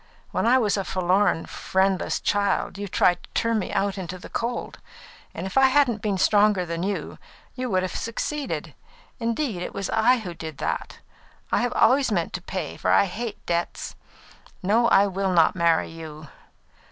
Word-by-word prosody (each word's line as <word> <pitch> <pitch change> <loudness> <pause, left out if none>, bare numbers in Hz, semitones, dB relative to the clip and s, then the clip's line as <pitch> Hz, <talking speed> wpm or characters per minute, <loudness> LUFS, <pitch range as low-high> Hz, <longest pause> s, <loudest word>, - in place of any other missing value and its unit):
When - - 0
I 250 +2 +6
was 210 -5 +1
a 195 - -1
forlorn, 185 -1 +1
friendless 190 0 0
child, 200 -1 0
you 205 - -4
tried 180 -2 +2
to - - -16
turn 230 -1 +1
me 190 - -4
out 200 0 0
into 185 0 -5
the - - -11
cold; 235 +1 -3 0.5
and - - -6
if 190 +8 +1
I 265 - +7
hadn't 260 -5 +2
been 205 -3 0
stronger 205 -1 +3
than 170 0 -4
you, 200 +2 -3 0.3
you 255 -1 -4
would 185 -1 +1
have 185 - -4
succeeded. 280 +5 -3 0.5
Instead, 230 -4 -1
it - - -5
was 195 -1 -3
I 235 +3 +4
who 190 -7 -6
did 160 -3 -8
that. - - -4 0.5
I've 245 - +1
always 265 -2 +4
meant 175 -5 -1
to 180 - -4
pay, 185 -3 -5
for - - -1
I - - +5
hate 220 +3 -6
debts. 170 0 -2 0.7
No, 225 +5 +3
I 200 -3 +5
will 195 -1 -1
not 165 0 +4
marry 170 -2 +2
you. 155 -2 -9
195 Hz, 175 wpm, -24 LUFS, 180-230 Hz, 0.7 s, I